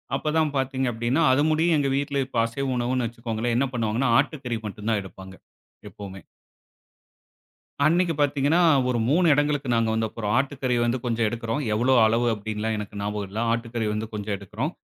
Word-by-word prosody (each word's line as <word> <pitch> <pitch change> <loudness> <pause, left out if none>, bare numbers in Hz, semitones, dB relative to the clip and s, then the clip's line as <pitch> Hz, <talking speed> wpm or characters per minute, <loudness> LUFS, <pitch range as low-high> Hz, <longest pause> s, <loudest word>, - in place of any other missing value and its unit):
அப்ப 150 +3 -2
தான் 155 -2 +1
பார்த்தீங்க 130 0 -1
அப்படின்னா 120 +7 0
அது 130 +2 +3
முடியு 160 +2 +2
எங்க 145 -1 +1
வீட்ல 140 0 -2
இப்ப 130 - -6
அசைவ 135 +4 -3
உணவுன்னு 120 0 0
வச்சுக்கோங்களேன், 115 0 -3
என்ன 135 +2 +2
பண்ணுவாங்கன்னா 115 +2 0
ஆட்டுக்கறி 125 -7 -2
மட்டும் 105 +1 -5
தான் 110 - +1
எடுப்பாங்க 95 0 -11 0.5
எப்பவுமே. 95 -3 -10 1.6
அன்னைக்கு 170 +2 +3
பார்த்தீங்கன்னா 145 +3 +2 0.3
ஒரு 125 - 0
3 175 +5 +3
இடங்களுக்கு 145 -2 0
நாங்க 115 -1 +1
வந்தப்புறம், 110 -1 -2
ஆட்டுக்கறி 135 -2 0
வந்து 120 +2 +1
கொஞ்சம் 115 -2 +1
எடுக்குறோம். 115 +4 -3
எவ்வளோ 120 +5 +2
அளவு 115 +2 +2
அப்படின்னுலாம் 110 +1 -3
எனக்கு 105 -1 -6
ஞாபகம் 105 0 -3
இல்ல. 105 +3 -5
ஆட்டுக்கறி 115 -1 -2
வந்து 110 +1 -3
கொஞ்சம் 105 -1 -3
எடுக்குறோம். 105 - -4
120 Hz, 160 wpm, -24 LUFS, 110-135 Hz, 1.6 s, அது